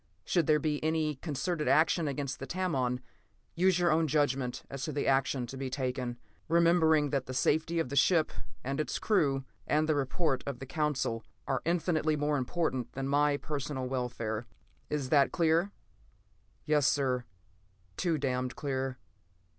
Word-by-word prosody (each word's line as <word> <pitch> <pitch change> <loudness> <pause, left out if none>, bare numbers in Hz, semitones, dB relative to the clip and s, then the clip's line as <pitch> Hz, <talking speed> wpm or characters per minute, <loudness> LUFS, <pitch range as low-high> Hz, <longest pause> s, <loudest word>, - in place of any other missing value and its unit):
Should 170 -5 +1
there 155 -1 +5
be 150 0 -1
any 155 -2 0
concerted 155 +2 -2
action 160 +1 +3
against 140 -2 -3
the 135 - -6
Tamon, 135 -9 -1 0.5
use 185 +1 +3
your 175 -2 +3
own 160 +1 +3
judgment 135 -4 0
as 140 -1 -6
to 155 - -3
the 145 - -2
action 135 -1 +2
to 125 - -8
be 135 0 -3
taken, 125 -2 -2 0.3
remembering 160 -3 +4
that 135 -3 -1
the 130 - -5
safety 160 +5 +1
of 165 -6 0
the 140 - -4
ship 155 +3 +4 0.3
and 135 +3 -2
its 145 -4 -1
crew, 140 -10 +1 0.2
and 155 +1 +2
the 155 - +3
report 140 0 0
of 140 -3 -3
the 135 - -7
Council, 135 -6 -1 0.2
are 130 - 0
infinitely 160 -2 +1
more 145 0 +1
important 130 -3 -1
than 135 0 -3
my 145 +1 +3
personal 145 -3 -3
welfare. 120 -3 -3 0.4
Is 145 -3 -2
that 140 -1 +4
clear?" 170 +3 +2 0.9
"Yes, 150 -3 +3
sir. 130 -3 +1 0.7
Too 170 -3 0
damned 130 -2 -1
clear." 135 -3 -2
145 Hz, 160 wpm, -31 LUFS, 130-160 Hz, 0.9 s, there